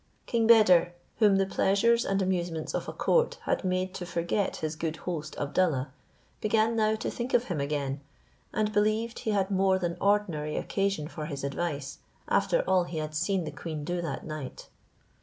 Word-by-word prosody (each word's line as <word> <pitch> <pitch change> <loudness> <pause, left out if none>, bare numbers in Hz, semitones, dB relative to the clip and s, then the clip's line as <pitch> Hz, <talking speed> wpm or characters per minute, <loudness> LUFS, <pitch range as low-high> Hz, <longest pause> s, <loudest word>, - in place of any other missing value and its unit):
King 230 -2 +1
Beder, 185 -6 +6 0.2
whom 210 -3 +5
the 195 0 +3
pleasures 230 +5 +2
and 195 0 +1
amusements 175 -4 -2
of - - -2
a - - -3
court 485 0 +1
had - - 0
made 185 0 -1
to 185 - -5
forget 170 +4 -1
his 155 0 -3
good 160 0 -3
host 155 -4 -4
Abdallah, 145 -3 0 0.5
began 220 +2 +2
now 215 -1 +2
to 220 - -3
think 245 +2 -2
of 235 - +4
him 175 - -3
again, 140 -1 -2 0.5
and 215 0 0
believed 215 +3 +1
he - - -3
had 200 -2 +1
more 190 0 +3
than 175 -2 -2
ordinary 180 -7 +1
occasion 195 -6 -1
for 155 -2 -6
his 140 -4 -5
advice, 140 0 -3 0.3
after - - +2
all 185 -2 +3
he 170 - -6
had 155 0 -3
seen 180 +4 0
the 155 - -5
queen 155 0 -6
do 175 +3 -2
that 165 -5 -4
night. 155 -4 -7
185 Hz, 180 wpm, -28 LUFS, 155-210 Hz, 0.5 s, Beder